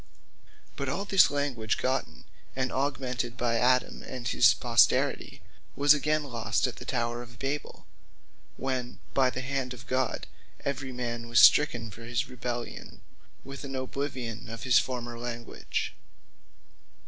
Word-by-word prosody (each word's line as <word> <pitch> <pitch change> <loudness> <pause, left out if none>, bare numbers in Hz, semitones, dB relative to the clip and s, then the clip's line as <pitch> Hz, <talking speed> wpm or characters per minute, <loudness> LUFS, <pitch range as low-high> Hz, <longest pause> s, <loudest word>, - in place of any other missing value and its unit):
But 140 -1 -2
all 190 +9 -2
this 195 -2 +6
language 135 -7 -1
gotten, 130 +1 -2 0.3
and 130 -1 -1
augmented 130 -3 -2
by 120 -2 +1
Adam 125 +1 +2
and 125 -2 -6
his 115 -2 +5
posterity, 120 -2 +2 0.3
was 145 +2 +6
again 150 +1 +1
lost 120 -5 0
at - - -3
the - - -9
tower 120 -1 -1
of 120 -1 -12
Babel, 140 +2 -4 0.7
when 130 -2 -3 0.2
by 130 -2 +4
the 125 - -4
hand 130 -1 -2
of 125 - -13
God, 130 0 -1 0.4
every 135 -1 -2
man 120 -2 -4
was 120 -2 +5
stricken 120 -7 +6
for 115 +3 -11
his 120 0 -1
rebellion, 120 -1 -6 0.4
with 135 +1 -8
an 135 -1 -5
oblivion 130 -4 -4
of 115 0 -7
his 125 -3 +6
former 120 -2 -4
language. 120 -1 -4
125 Hz, 140 wpm, -29 LUFS, 120-135 Hz, 0.7 s, this